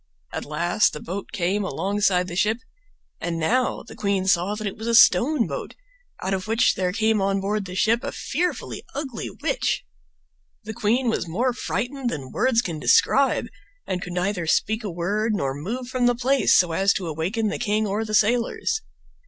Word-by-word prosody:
At - - -4
last 170 +7 +1
the 150 - -6
boat 190 +6 -6
came 195 +3 0
alongside 190 +2 +1
the 175 - -6
ship, 215 +4 +2 0.6
and 170 -1 -3
now 240 +11 +1
the - - -12
queen 200 -2 0
saw 190 +2 +2
that 215 0 -5
it 200 - -3
was 220 - -7
a 235 - +2
stone 235 +6 +5
boat, - - -6 0.5
out 190 - -1
of 185 0 -3
which 225 +2 +3
there 180 -1 -1
came 220 +1 +1
on 195 0 +1
board 200 +1 -1
the 180 0 -7
ship 225 +5 +2
a - - -3
fearfully 355 +5 -3
ugly 270 -5 -4
witch. - - -1 0.8
The 220 +1 -6
queen 235 +3 +1
was 220 - -1
more 240 +10 0
frightened 250 +1 -3
than 135 - -6
words 240 -2 +2
can 165 -4 -4
describe, 275 - +3 0.4
and 180 -1 -3
could 180 - -6
neither 180 -1 -1
speak 220 +7 +1
a 205 - -3
word 205 +6 -1
nor 135 -8 -1
move 230 - -5
from 255 -1 +1
the 245 - +3
place 255 0 +3
so 180 -2 +3
as 195 +4 +3
to 185 - -3
awaken 175 +8 -1
the - - -3
king 215 -2 +1
or 210 +2 -1
the 215 -1 -2
sailors. 235 - +1
205 Hz, 190 wpm, -24 LUFS, 180-230 Hz, 0.8 s, stone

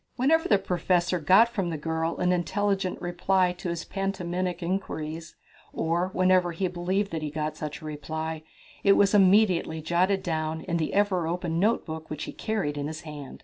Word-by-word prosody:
Whenever 310 +6 +2
the 205 - +6
professor 180 -1 0
got 190 +9 +6
from 200 -7 -2
the 160 - -3
girl 160 +2 -2
an 180 - +1
intelligent 190 +1 0
reply 180 +1 +1
to 180 0 -6
his 170 -1 -4
pantomimic 185 -2 -3
inquiries, 165 -3 -4 0.4
or 170 +3 0
whenever 185 -1 +3
he 185 +3 -1
believed 180 +3 -1
that 160 -1 -3
he 155 - -3
got 155 +1 -3
such 150 0 -6
a - - -8
reply, 160 +1 -4 0.4
it 200 - +6
was 200 0 +3
immediately 190 -4 +4
jotted 180 +5 +1
down 160 -1 -2
in 170 -2 -2
the 160 +2 -2
ever 195 -5 +2
open 170 -1 -2
notebook 160 -6 -1
which 150 -1 -5
he - - -5
carried 195 -10 -2
in 145 - -2
his 155 0 -6
hand. 150 -4 -9
175 Hz, 180 wpm, -27 LUFS, 160-190 Hz, 0.4 s, the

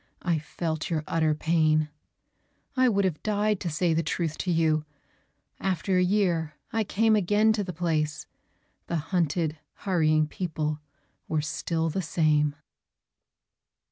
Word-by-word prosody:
I 170 -3 +1
felt 160 0 -3
your 160 -3 -1
utter 160 -2 +2
pain. 155 -1 +2 0.9
I 255 -1 +4
would 200 -3 +2
have 170 -5 -1
died 210 -1 +1
to 175 - -3
say 165 +2 +1
the 160 - +2
truth 160 0 -2
to 180 - -1
you. 160 -2 +2 0.8
After 190 0 0
a 180 - +4
year 175 -5 +1 0.2
I 225 -1 +2
came 220 +2 +2
again 210 +2 +3
to 210 -1 -1
the 185 - -4
place 155 -3 -1 0.6
The 170 - -2
hunted 160 -1 0 0.3
hurrying 155 -5 +3
people 155 -3 -3 0.5
were 155 -1 0
still 165 +1 -1
the 190 - -1
same.... 150 -3 +2
165 Hz, 140 wpm, -27 LUFS, 155-190 Hz, 0.9 s, I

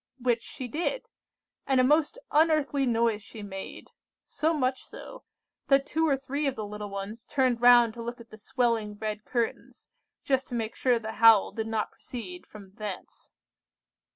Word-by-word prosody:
which 240 -2 +1
she 255 - -7
did, 345 - -3 0.6
and 270 -1 +3
a - - +5
most 300 - +2
unearthly 300 -3 +3
noise 230 -2 +1
she 210 +1 -10
made; 195 -1 -8 0.3
so 315 +1 -1
much 260 -4 -1
so, - - -11 0.4
that 275 0 +4
two 320 +1 0
or 275 -3 +2
three 275 +2 -2
of 270 - -1
the 215 - -4
little 210 0 -6
ones 200 +3 -6
turned 255 -4 0
round 240 -2 +7
to 235 - -8
look 235 +1 -6
at 230 -1 -14
the - - -10
swelling 230 -3 -1
red 215 -1 -4
curtains, 235 -2 -4 0.3
just 265 -1 0
to 245 - -5
make 225 -1 -3
sure 250 -2 +2
the 220 -1 -5
howl 225 -3 +7
did 220 -1 -4
not 220 -1 -2
proceed 355 +9 -8
from 200 -3 -13
thence. 205 -4 -7
240 Hz, 175 wpm, -28 LUFS, 220-275 Hz, 0.6 s, round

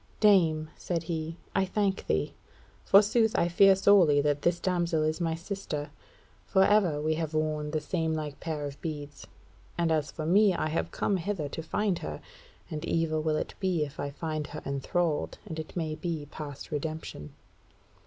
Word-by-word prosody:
"Dame," 165 -7 +4
said 170 -2 -3
he, 160 0 -4 0.2
"I - - +3
thank 195 0 -1
thee: 75 -1 0 0.5
forsooth 215 +2 +4
I 170 - +3
fear 195 +3 +6
sorely 190 -7 +5
that 145 0 +1
this 170 0 +1
damsel 175 -3 +1
is 155 +2 -1
my 165 -1 0
sister; 165 -4 -5 0.6
for 190 -1 +4
ever 190 -8 +3
we 155 +1 +1
have 155 -1 -3
worn 155 -1 0
the 155 +1 -1
samelike 155 -2 -2
pair 155 -3 -3
of 140 0 -7
beads. 145 -3 -6 0.5
And 170 -1 +1
as 155 -2 +1
for 155 - -5
me 195 +3 +5
I 155 - -1
have 160 - -1
come 200 - 0
hither 180 -4 -2
to 160 - -5
find 190 +3 -1
her, 75 -1 -5 0.5
and 150 -1 -4
evil 160 -1 0
will 155 0 +1
it - - -3
be 180 -6 +1
if 140 0 -12
I 140 - -2
find 155 +1 -4
her 155 - -8
enthralled, 150 +4 -1
and 160 -6 -6
it 155 - -7
may 160 -3 -2
be 155 -1 -4
past 145 -3 -8
redemption." 150 - -5
160 Hz, 175 wpm, -29 LUFS, 150-180 Hz, 0.6 s, fear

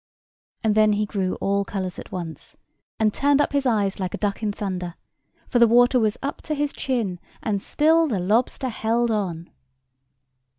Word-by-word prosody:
And 220 -1 +3
then 215 0 +4
he 210 +1 0
grew 195 -3 -2
all 200 0 0
colours 190 -2 -4
at - - -10
once, 170 -3 -7 0.4
and 215 -1 +2
turned 285 0 +3
up 290 - +1
his 280 -2 +1
eyes 205 -5 +1
like 185 -2 -2
a - - -7
duck 205 0 -2
in 215 -2 0
thunder; 185 -4 -4 0.5
for 245 - +1
the 235 - +7
water 245 +2 +5
was 215 -2 +1
up 280 - -3
to 305 - -3
his 290 0 -1
chin, 225 -9 -2 0.2
and 205 -3 -1
still 320 +6 +3
the 230 -8 -1
lobster 230 +7 +1
held 230 +1 0
on. 175 -6 -3
215 Hz, 180 wpm, -23 LUFS, 195-245 Hz, 0.5 s, the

